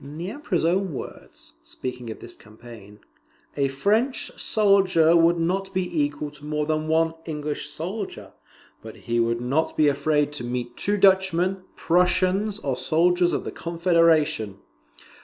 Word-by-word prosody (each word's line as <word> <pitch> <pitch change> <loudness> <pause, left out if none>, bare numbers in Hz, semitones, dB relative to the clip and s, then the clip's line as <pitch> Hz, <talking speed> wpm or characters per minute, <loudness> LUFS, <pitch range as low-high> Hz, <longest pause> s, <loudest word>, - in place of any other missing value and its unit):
In 145 +2 -10
the 175 +4 -4
Emperor's 215 - -2
own 185 0 +1
words, - - -10
speaking 125 -2 -7
of 110 - -8
this - - -8
campaign, 105 -2 -14 0.5
"A 140 -1 +1
French 210 - 0
soldier 190 -6 +3
would 170 +1 +4
not 190 +4 -1
be 180 -4 0
equal 145 0 -4
to 150 0 -16
more 150 0 -2
than 155 0 -1
one 165 +1 +2
English 150 -2 -4
soldier, 185 +7 -6 0.5
but 110 -1 -10
he 120 0 0
would 115 0 0
not 140 +6 -1
be 155 - +4
afraid 145 +1 +1
to 145 - -5
meet 120 0 -4
two 205 +1 0
Dutchmen, 190 -1 +2
Prussians, 185 +4 +1
or 140 -10 -2
soldiers 175 +5 +2
of - - -2
the - - -5
Confederation." 165 - +1
160 Hz, 150 wpm, -24 LUFS, 145-185 Hz, 0.5 s, would